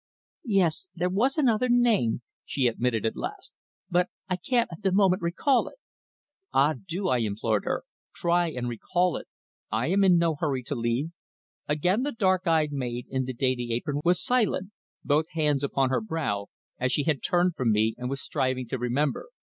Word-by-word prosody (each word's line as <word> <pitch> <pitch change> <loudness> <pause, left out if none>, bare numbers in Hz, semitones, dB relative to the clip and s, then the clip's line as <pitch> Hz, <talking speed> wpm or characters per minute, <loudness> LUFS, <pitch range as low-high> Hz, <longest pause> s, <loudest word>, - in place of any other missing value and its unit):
"Yes, 185 -3 +2
there 180 +1 0
was 245 - +2
another 250 -4 +2
name," 230 - +3 0.2
she 135 - -1
admitted 115 -1 0
at 110 - 0
last, - - -6 0.3
"but 180 +1 +1 0.2
I 185 - 0
can't 235 +6 +1
at 165 - -9
the 195 -2 +1
moment 190 -1 +3
recall 235 +10 +2
it." - - -10 0.8
"Ah, 145 +3 +4
do!" 185 +3 -2
I 125 -8 +2
implored 110 -1 -1
her. - - -1 0.3
"Try 175 0 +2
and 125 -5 -4
recall 175 +9 0
it. - - -6 0.4
I 115 +7 0
am 195 +2 +3
in 180 -2 +6
no 170 -1 +2
hurry 145 -4 -2
to 130 - -4
leave." 120 +5 -1 0.6
Again 180 +9 +1
the 290 +2 -1
dark 185 -4 +1
eyed 160 -2 +3
maid 125 -3 -3
in 130 -1 0
the 130 - -4
dainty 125 -1 -1
apron 145 +4 -2
was 175 +1 +3
silent 220 -6 +1 0.3
both 155 +3 +1
hands 150 -4 +1
upon 135 -1 +1
her - - +1
brow, 155 - -2 0.3
as 130 0 0
she 145 - +1
had 150 -3 0
turned 175 -1 +2
from 120 -3 +1
me 110 +1 +2
and 125 0 -3
was 135 0 -3
striving 130 -1 -1
to 130 - -2
remember. 135 - -1
155 Hz, 185 wpm, -27 LUFS, 125-185 Hz, 0.8 s, in